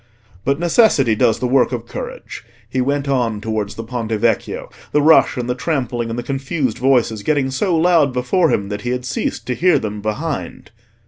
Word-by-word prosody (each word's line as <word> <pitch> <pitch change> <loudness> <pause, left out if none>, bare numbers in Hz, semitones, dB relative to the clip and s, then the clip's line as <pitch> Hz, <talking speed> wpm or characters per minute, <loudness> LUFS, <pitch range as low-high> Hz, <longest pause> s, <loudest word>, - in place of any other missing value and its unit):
But 140 +2 +1
necessity 170 - +3
does 110 +1 +2
the 125 - -1
work 125 -2 +3
of 120 -2 -4
courage. - - -7 0.2
He 130 +3 -1
went 140 +2 -1
on 120 -6 0
towards 105 -1 -3
the 115 - -6
Ponte 115 -1 -4
Vecchio, 110 0 -1 0.2
the 150 - +4
rush 160 -3 +5
and 120 -1 -2
the 125 - 0
trampling 125 -4 -2
and 115 - -4
the 120 - -3
confused 135 -2 -2
voices 125 -4 +2
getting 135 +2 0
so 170 +6 0
loud 165 -4 +4
before 125 +8 +1
him 100 -1 0
that 105 0 -4
he 120 - -4
had 125 0 -2
ceased - - -3
to 125 - -1
hear 175 +6 +3
them 105 -1 -4
behind. 105 0 -4
125 Hz, 195 wpm, -19 LUFS, 115-140 Hz, 0.2 s, rush